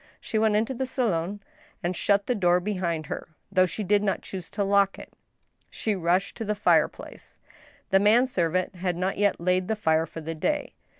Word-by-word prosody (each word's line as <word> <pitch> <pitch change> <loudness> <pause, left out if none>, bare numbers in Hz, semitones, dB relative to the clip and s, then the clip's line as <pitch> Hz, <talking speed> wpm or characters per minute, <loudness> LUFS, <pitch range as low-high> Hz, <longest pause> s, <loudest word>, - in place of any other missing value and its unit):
She 220 - -2
went 215 -1 +3
into 225 +5 +1
the 260 +1 -3
salon 205 -6 -1 0.4
and 175 +1 -1
shut 200 +3 +2
the 250 - +1
door 180 -5 +3
behind 175 -5 -2
her, - - -6 0.2
though 185 -1 +4
she 180 +5 -4
did 205 +1 +3
not 200 -2 -1
choose 185 -3 -7
to 205 - -2
lock 200 0 +2
it. - - -12 0.6
She 215 -2 -2
rushed 180 +1 0
to 225 - -3
the 210 0 -1
fireplace. 205 - 0 0.5
The 195 - +6
man 220 +5 +5
servant 185 -5 -1
had 180 -1 -1
not 185 +2 -1
yet 205 -1 +2
laid 180 +1 +1
the 220 - 0
fire 160 -5 +1
for 165 - -8
the 165 +1 -5
day. 295 - -2
195 Hz, 195 wpm, -26 LUFS, 175-210 Hz, 0.6 s, The